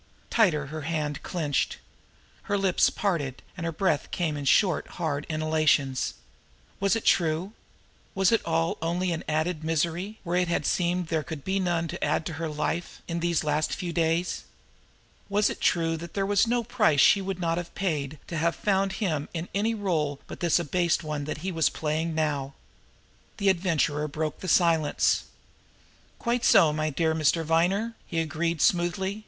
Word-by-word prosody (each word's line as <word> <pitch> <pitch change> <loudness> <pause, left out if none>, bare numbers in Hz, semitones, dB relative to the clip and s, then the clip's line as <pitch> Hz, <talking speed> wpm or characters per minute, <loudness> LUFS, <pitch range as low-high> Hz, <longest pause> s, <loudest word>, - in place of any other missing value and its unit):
Tighter 175 -10 +3
her 155 - -4
hand 150 -2 -2
clenched. 150 -6 -1 0.7
Her 205 - +2
lips 195 -2 +3
parted, 155 -10 -2
and 170 -1 -4
her - - -1
breath 155 -3 0
came 165 -4 -1
in 145 -1 -5
short, 175 +6 +3
hard 150 -4 -2
inhalations. 155 -4 +1 0.6
Was 195 0 +2
it 225 - -3
true? 170 +4 +2 0.6
Was 195 +1 +3
it 230 - +3
all 165 0 0
only 175 +2 0
an 165 - -3
added 155 +1 -1
misery, 170 +6 -1
where 175 -1 -1
it 180 0 +2
had 170 - -1
seemed 175 -1 0
there 160 -2 +1
could 155 -1 -7
be 195 +1 0
none 175 -3 0
to - - -5
add 160 - +1
to 170 - -4
her 165 - -1
life 155 +3 -3
in 170 0 -2
these 170 -2 +1
last 150 0 0
few 175 -3 -4
days? 165 +1 0 0.9
Was 205 +1 +2
it - - -8
true 165 -1 +2
that 170 +1 -9
there 195 -1 +1
was 205 +2 +3
no 240 0 +1
price 210 - +2
she 200 - +6
would 190 -1 -4
not 165 -1 0
have 175 - -8
paid 155 -6 -2
to 170 - -5
have 170 +2 +1
found 195 -1 +1
him 160 -8 -2
in 165 +2 -4
any 220 +3 +1
role 155 -9 -1
but - - -9
this 170 -2 +3
abased 170 +1 +1
one 150 -2 -3
that 155 - -4
he 190 - -1
was 165 -2 +2
playing 160 +1 -2
now? 145 -3 -1 0.8
The 200 -2 +2
Adventurer 160 -5 +1
broke 155 +1 -3
the 185 - -6
silence. 165 -3 +3 0.9
"Quite 235 0 -1
so, 170 -11 +6
my 155 0 0
dear 160 +2 +1
Mr. 160 +1 +2
Viner!" 180 +8 +1
he 165 - -4
agreed 165 +1 -1
smoothly. 190 +3 +1
165 Hz, 175 wpm, -27 LUFS, 155-185 Hz, 0.9 s, she